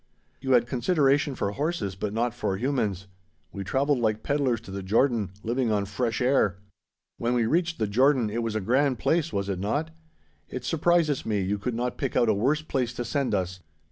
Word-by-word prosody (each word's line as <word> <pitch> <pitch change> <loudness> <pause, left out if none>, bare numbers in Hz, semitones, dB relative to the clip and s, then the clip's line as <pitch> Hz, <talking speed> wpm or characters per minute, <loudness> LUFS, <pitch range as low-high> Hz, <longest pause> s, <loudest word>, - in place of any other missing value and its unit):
You 130 - 0
had 120 -2 +5
consideration 135 +2 +2
for 100 - -1
horses, 140 - -2
but 100 +2 -4
not 115 +2 0
for 95 - -2
humans. 105 -6 -1 0.5
We 100 - -5
travelled 135 +6 +1
like 110 -2 0
pedlars 140 -5 +1
to 100 - -11
the 100 0 -4
Jordan, 110 +1 +2
living 120 0 0
on 100 -1 +1
fresh 115 +4 -2
air. 125 -7 +2 0.6
When 120 +1 0
we 120 -2 +2
reached 170 +6 +1
the 110 - 0
Jordan, 125 +3 +3
it 115 +2 -1
was 115 -2 -2
a 110 - 0
grand 130 +5 +2
place, 165 +4 +1
was 100 -1 -2
it 95 -2 -2
not? 145 - -1 0.6
It 125 -1 -6
surprises 165 -1 +2
me 105 -3 0
you 100 +2 -1
could 120 +3 -3
not 125 +1 -2
pick 135 - -2
out 120 - +3
a - - +5
worse 135 +9 +1
place 125 -5 -1
to 120 - -4
send 135 -2 0
us. 95 -1 -2
120 Hz, 205 wpm, -26 LUFS, 105-140 Hz, 0.6 s, had